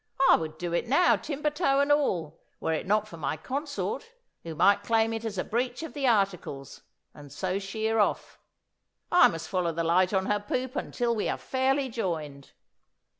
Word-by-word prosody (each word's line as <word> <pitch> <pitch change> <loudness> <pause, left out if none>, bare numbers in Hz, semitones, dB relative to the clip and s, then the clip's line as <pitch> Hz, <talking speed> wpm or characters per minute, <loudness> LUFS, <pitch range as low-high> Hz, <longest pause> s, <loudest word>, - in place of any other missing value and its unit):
I - - +8
would 155 -1 -4
do 175 0 -4
it 175 - 0
now, 315 +8 +4
timber 295 0 -2
toe 295 -3 +1
and 285 +1 +2
all, 175 - 0 0.2
were 160 - -1
it 160 - -3
not 210 +1 +2
for 170 - -10
my 155 0 -2
consort, 285 - -4 0.3
who 165 -1 -7
might 200 +6 +4
claim 225 +1 +1
it 225 0 -4
as 220 -3 -4
a - - 0
breach 245 +5 -2
of 320 - -7
the 280 -3 -1
articles, 185 - -1 0.3
and 145 -2 -13
so 185 0 -2
sheer 220 +3 -1
off. 205 - 0 0.7
I 355 0 +7
must 165 -1 -5
follow 180 -1 0
the 165 +1 -2
light 180 +3 +3
on 190 -2 +1
her 210 0 +1
poop 255 +6 -3
until 240 -3 -1
we 210 - -1
are - - -1
fairly 265 +1 0
joined." 160 - -4
210 Hz, 190 wpm, -28 LUFS, 170-260 Hz, 0.7 s, I